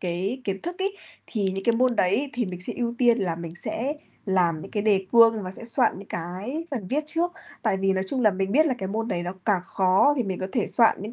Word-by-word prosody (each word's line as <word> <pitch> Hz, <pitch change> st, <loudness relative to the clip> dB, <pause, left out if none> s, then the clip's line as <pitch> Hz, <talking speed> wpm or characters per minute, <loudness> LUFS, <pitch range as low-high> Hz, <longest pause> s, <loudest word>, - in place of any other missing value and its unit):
cái 185 Hz, +8 st, -2 dB
kiến 195 Hz, -3 st, -2 dB
thức 350 Hz, +2 st, -5 dB
ấy, 390 Hz, +1 st, -1 dB, 0.3 s
thì 215 Hz, -4 st, -2 dB
những 195 Hz, -, -4 dB
cái 235 Hz, -, +3 dB
môn 250 Hz, -1 st, +2 dB
đấy 230 Hz, +10 st, +2 dB
thì 245 Hz, -, 0 dB
mình 180 Hz, -1 st, -6 dB
sẽ 185 Hz, -, -3 dB
ưu 235 Hz, -1 st, -1 dB
tiên 240 Hz, -2 st, +4 dB
là 175 Hz, -4 st, -1 dB
mình 170 Hz, 0 st, -7 dB
sẽ 250 Hz, +10 st, -2 dB, 0.3 s
làm 175 Hz, -4 st, +2 dB
những 195 Hz, -, -9 dB
cái 205 Hz, -, -1 dB
đề 195 Hz, -3 st, +2 dB
cương 230 Hz, -2 st, +6 dB
và 185 Hz, -, -5 dB
sẽ 230 Hz, -, -8 dB
soạn 240 Hz, -4 st, +1 dB
những 200 Hz, -, -11 dB
cái 190 Hz, -, -4 dB
phần 225 Hz, -9 st, -4 dB
viết 285 Hz, +7 st, +1 dB
trước, 340 Hz, +3 st, 0 dB, 0.3 s
tại 195 Hz, -, +1 dB
vì 195 Hz, 0 st, +2 dB
nói 190 Hz, 0 st, -1 dB
chung 260 Hz, +2 st, 0 dB
là 215 Hz, -, +6 dB
mình 195 Hz, 0 st, -2 dB
biết 310 Hz, +5 st, +5 dB
là 270 Hz, -, +1 dB
cái 190 Hz, -, -3 dB
môn 225 Hz, +3 st, -2 dB
đấy 175 Hz, -, -1 dB
nó 175 Hz, +1 st, -4 dB
càng 200 Hz, -4 st, +2 dB
khó 190 Hz, +11 st, +3 dB
thì 250 Hz, -, +1 dB
mình 190 Hz, -4 st, -3 dB
có 185 Hz, -, -2 dB
thể 235 Hz, -, +1 dB
soạn 230 Hz, -2 st, +4 dB
những 215 Hz, +4 st, -6 dB
205 Hz, 270 wpm, -25 LUFS, 185-245 Hz, 0.3 s, cương